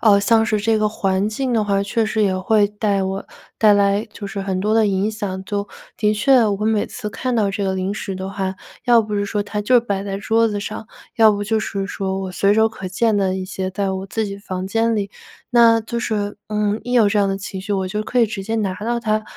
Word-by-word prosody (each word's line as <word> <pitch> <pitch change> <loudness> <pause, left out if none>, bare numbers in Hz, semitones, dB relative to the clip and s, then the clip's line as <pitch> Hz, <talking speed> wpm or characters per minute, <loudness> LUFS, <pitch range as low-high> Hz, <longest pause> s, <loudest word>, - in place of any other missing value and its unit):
呃 210 -3 +5
像 225 +2 +3
是 215 -2 +1
这 220 +1 +1
个 215 0 +2
环 195 -1 0
境 250 +4 -2
的 225 -2 +2
话， 200 -1 +1
确 220 +3 0
实 215 0 0
也 190 -2 +2
会 205 +2 +3
带 205 -1 -1
我 190 +1 -3 0.3
带 210 -2 +6
来 200 +1 +2
就 205 - -8
是 200 0 -5
很 195 -1 -2
多 210 +3 0
的 220 -1 +4
影 200 +2 0
响， 200 -3 -4
就 200 0 -3 0.3
的 210 0 +2
确 240 +2 +4
我 205 0 -1
每 220 -1 +1
次 210 -4 -6
看 255 +2 -2
到 210 -3 +2
这 200 +1 -3
个 190 -1 0
零 190 +1 -2
食 200 -2 -5
的 190 +1 -5
话， 190 -1 -3 0.3
要 240 -2 +5
不 210 -1 -5
是 205 0 0
说 205 0 -1
它 210 0 -4
就 245 +4 +4
摆 200 -4 -2
在 195 -1 -4
桌 225 +3 +2
子 205 -1 -3
上， 215 +1 -6 0.3
要 220 -1 +7
不 205 0 -2
就 220 +1 0
是 195 -1 -3
说 190 -1 -3
我 190 -1 -5
随 200 +3 +2
手 220 +1 +4
可 205 -4 -6
见 220 +4 +1
的 190 -2 +1
一 185 - -4
些 185 0 -4
在 195 +1 -1
我 190 0 -4
自 220 +3 -2
己 200 -1 -6
房 185 -2 -5
间 225 +3 +1
里， 200 -1 -2 0.4
那 235 -2 +6
就 235 +2 -4
是， 205 -3 -2
嗯， 210 0 0
一 245 - -4
有 230 -4 +5
这 205 +1 +2
样 200 -1 +3
的 195 - -1
情 190 -1 -6
绪， 200 - -8
我 190 -1 -1
就 210 +3 -2
可 245 - -2
以 235 - +6
直 210 -2 -4
接 220 +3 -3
拿 205 -4 0
到 235 +4 -2
它， 215 -2 0
205 Hz, 275 characters per minute, -20 LUFS, 195-220 Hz, 0.4 s, 要